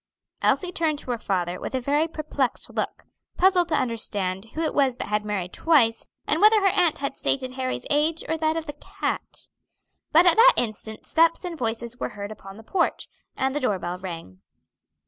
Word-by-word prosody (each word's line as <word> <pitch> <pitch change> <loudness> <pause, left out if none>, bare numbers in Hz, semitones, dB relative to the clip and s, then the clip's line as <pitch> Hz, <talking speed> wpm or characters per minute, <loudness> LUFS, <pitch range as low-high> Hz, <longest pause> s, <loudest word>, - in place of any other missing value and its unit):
Elsie 365 -1 +1
turned 320 -3 0
to 260 - -6
her 235 - -2
father 180 -3 -2
with - - -5
a - - +1
very 290 +5 +1
perplexed 305 -5 -3
look, - - -3 0.3
puzzled 360 -2 +4
to 310 - +2
understand 205 -5 -2
who 320 - -2
it 315 - -1
was 265 -3 +2
that - - -5
had 210 0 0
married 195 -4 -3
twice, 250 -9 +2 0.2
and - - 0
whether 430 +1 +7
her 390 -2 +2
aunt 355 -5 +2
had 280 -1 -3
stated 260 -1 -1
Harry's 255 0 -3
age 305 +3 +1
or 320 - 0
that 315 0 0
of 325 - -3
the 295 - -6
cat. - - -5 0.6
But 335 +3 +6
at 350 +2 +5
that - - +8
instant 220 -1 -1
steps 330 +2 +2
and 350 -2 -4
voices 235 -2 -4
were - - -2
heard 200 +1 -5
upon 195 -2 -11
the 225 - -12
porch, 345 - -1 0.3
and 265 0 0
the - - +1
door 210 -8 0
bell 175 0 -5
rang. 165 - -8
265 Hz, 200 wpm, -25 LUFS, 215-325 Hz, 0.6 s, that